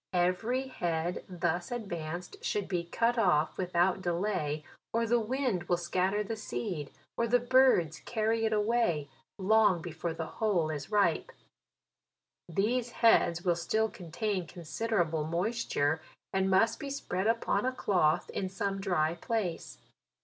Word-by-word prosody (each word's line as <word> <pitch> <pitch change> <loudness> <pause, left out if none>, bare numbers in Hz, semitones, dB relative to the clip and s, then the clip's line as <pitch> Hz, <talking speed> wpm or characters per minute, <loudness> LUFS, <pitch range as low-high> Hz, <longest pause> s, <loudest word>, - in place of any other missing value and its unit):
Every 185 +9 +1
head 170 -7 -2
thus 175 0 -1
ad 240 -4 -4
vanced 170 0 -6
should 205 -2 -1
be 175 -3 -1
cut 235 +7 +1
off 160 -7 +3
without 180 +1 +1
delay, 170 -4 -1 0.3
or 230 +1 +1
the 235 +1 +3
wind 230 -5 -1
will 175 0 +1
scatter 185 +4 0
the 220 +2 -4
seed, 190 -8 -4 0.3
or 235 - +1
the 245 +2 +4
birds 245 - +4
carry 225 0 0
it 220 - +1
away, 210 -9 +1 0.3
long 205 -1 +4
before 165 0 -4
the 165 - -3 0.2
whole 180 -8 +2
is 145 -2 -5
ripe. 200 -6 +2 1.2
These 235 +7 0
heads 175 -6 +4
will 175 -2 +3
still 220 +6 0
contain 185 +1 -3
considerable 170 -1 -1
moisture, 165 -3 0 0.3
and 190 0 +2
must 225 +4 +3
be 280 - -5
spread 195 -8 -2
upon 225 -3 +1
a 255 - +1
cloth, 180 -11 +1
in 190 - -2
some 195 0 -2
dry 170 -5 +1
place. 180 0 -3
190 Hz, 140 wpm, -31 LUFS, 170-225 Hz, 1.2 s, the